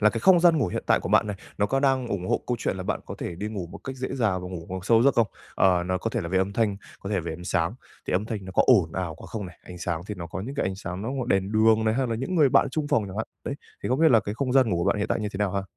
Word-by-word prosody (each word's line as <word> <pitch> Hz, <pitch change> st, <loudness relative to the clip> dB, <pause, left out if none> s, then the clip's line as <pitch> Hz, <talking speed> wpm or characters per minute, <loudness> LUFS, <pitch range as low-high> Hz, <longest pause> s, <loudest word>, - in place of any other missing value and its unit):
là 105 Hz, 0 st, +5 dB
cái 115 Hz, 0 st, -3 dB
không 185 Hz, -3 st, +6 dB
gian 170 Hz, -3 st, +5 dB
ngủ 125 Hz, -, +2 dB
hiện -, -, -3 dB
tại -, -, +4 dB
của -, -, -5 dB
bạn -, -, +4 dB
này, 105 Hz, -1 st, -3 dB, 0.2 s
nó 105 Hz, -, +3 dB
có 135 Hz, +5 st, 0 dB
đang 135 Hz, -3 st, +2 dB
ủng 95 Hz, -4 st, -3 dB
hộ -, -, +1 dB
câu 125 Hz, -, 0 dB
chuyện -, -, -1 dB
là 95 Hz, -, -4 dB
bạn -, -, -2 dB
có -, -, -6 dB
thể 85 Hz, -, -4 dB
đi 105 Hz, +5 st, -4 dB
ngủ 100 Hz, -5 st, -5 dB
một -, -, -10 dB
cách 135 Hz, -1 st, -5 dB
dễ 130 Hz, 0 st, -3 dB
dàng 100 Hz, -8 st, 0 dB
và 90 Hz, -, -6 dB
ngủ 85 Hz, -2 st, -7 dB
vào 95 Hz, 0 st, -3 dB
sâu 115 Hz, +3 st, +4 dB
giấc 140 Hz, 0 st, +4 dB
không? 115 Hz, -2 st, +4 dB, 0.3 s
Ờ, 90 Hz, -2 st, +3 dB
nó 95 Hz, 0 st, 0 dB
có 115 Hz, -, -2 dB
thể -, -, -1 dB
là 85 Hz, -, -4 dB
về 95 Hz, +1 st, +1 dB
âm 95 Hz, +1 st, 0 dB
thanh, 105 Hz, -2 st, +1 dB, 0.2 s
có 100 Hz, -, -6 dB
thể -, -, 0 dB
là -, -, +1 dB
về 80 Hz, -1 st, -4 dB
ánh 90 Hz, +2 st, -8 dB
sáng. 90 Hz, +2 st, 0 dB, 0.3 s
Thì -, -, -2 dB
âm 100 Hz, +3 st, +1 dB
thanh 105 Hz, -4 st, -4 dB
nó 95 Hz, -, -8 dB
có -, -, +5 dB
ồn 95 Hz, -11 st, +5 dB
ào 90 Hz, -4 st, -3 dB
quá -, -, -12 dB
không 105 Hz, -4 st, -5 dB
này? 90 Hz, -, -13 dB
Ánh 90 Hz, -1 st, -10 dB
sáng 85 Hz, -1 st, -2 dB
thì 105 Hz, -, -4 dB
nó 85 Hz, -2 st, -6 dB
có 85 Hz, +3 st, -6 dB
những 135 Hz, +7 st, -6 dB
cái 140 Hz, -, 0 dB
ánh 95 Hz, -, -2 dB
sáng 90 Hz, 0 st, -6 dB
nó 115 Hz, -, -3 dB, 0.2 s
đèn 95 Hz, 0 st, +1 dB
đường 110 Hz, 0 st, +4 dB
này, 110 Hz, 0 st, +2 dB
hay 130 Hz, 0 st, +1 dB
là 115 Hz, -, -1 dB
những 135 Hz, +10 st, -3 dB
người 150 Hz, -5 st, +5 dB
bạn 140 Hz, -, +4 dB
chung 150 Hz, -1 st, -2 dB
phòng 110 Hz, -, +2 dB
chẳng 95 Hz, +1 st, -8 dB
hạn. 110 Hz, -, -2 dB, 0.2 s
Đấy. 140 Hz, -, -3 dB, 0.3 s
Thì -, -, -2 dB
không 130 Hz, +4 st, +1 dB
biết 160 Hz, -1 st, +6 dB
là 115 Hz, -3 st, +6 dB
cái 100 Hz, +2 st, -5 dB
không 130 Hz, 0 st, -1 dB
gian 130 Hz, -4 st, +4 dB
ngủ 90 Hz, -, +1 dB
của 85 Hz, -, 0 dB
bạn -, -, +2 dB
hiện 100 Hz, -, -1 dB
tại -, -, 0 dB
như 105 Hz, -, -2 dB
thế 95 Hz, -, -7 dB
nào 100 Hz, -2 st, 0 dB
ha? 100 Hz, 0 st, -1 dB
105 Hz, 365 wpm, -26 LUFS, 95-120 Hz, 0.3 s, không